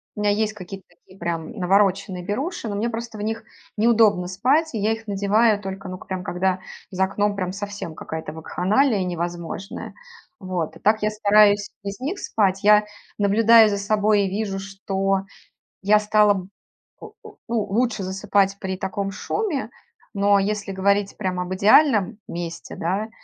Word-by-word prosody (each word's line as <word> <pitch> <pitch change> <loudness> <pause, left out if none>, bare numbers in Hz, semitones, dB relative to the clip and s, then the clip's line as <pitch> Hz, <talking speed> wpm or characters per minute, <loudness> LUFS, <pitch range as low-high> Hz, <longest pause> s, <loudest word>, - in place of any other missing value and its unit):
У 210 - -4
меня 205 0 +3
есть 215 +1 0
какие-то 195 -1 -9
такие 175 +2 -21
прям 170 +2 -3
навороченные 195 -2 +1
беруши. 260 - -3
Но 205 - -3
мне 220 +4 -1
просто 230 -1 -6
в - - -6
них 220 +1 -3 0.3
неудобно 215 -5 +4
спать, 260 - +1
и 220 - -2
я 215 +2 +1
их 225 0 -9
надеваю 205 +2 +2
только, 190 -1 -6
ну 185 - -6
к - - -15
прям, 185 -1 -4
когда 185 +1 -1 0.3
за 190 +1 0
окном 205 +1 -1
прям 185 -2 -2
совсем 200 -4 -6
какая-то 160 -1 -6
вакханалия 200 - +1
невозможная. 175 +2 -5 0.5
Вот. 180 -5 -3
А - - -19
так 215 0 +2
я 215 - +3
стараюсь 205 -1 +4
без 200 +3 -5
них 320 +10 -3
спать. 195 -2 0
Я 210 0 +6 0.3
наблюдаю 220 +2 +6
за 200 - -1
собой, 205 0 +2
и 190 - -1
вижу, 195 -1 -3
что 195 0 -2 0.6
я 210 +2 +4
стала 210 0 +4
б 185 -1 -6 0.5
о 435 -1 -11 0.4
ну, 235 -1 +1
лучше 225 +1 0
засыпать 195 +1 0
при 190 -1 -4
таком 195 +1 -3
шуме, 295 - -2 0.4
но 200 -1 +3
если 200 0 -2
говорить 200 +1 +1
прям 185 -3 -2
об 180 +1 -3
идеальном 215 - +4
месте, 170 -1 -6
да, 195 +6 -2
200 Hz, 165 wpm, -23 LUFS, 190-215 Hz, 0.6 s, Я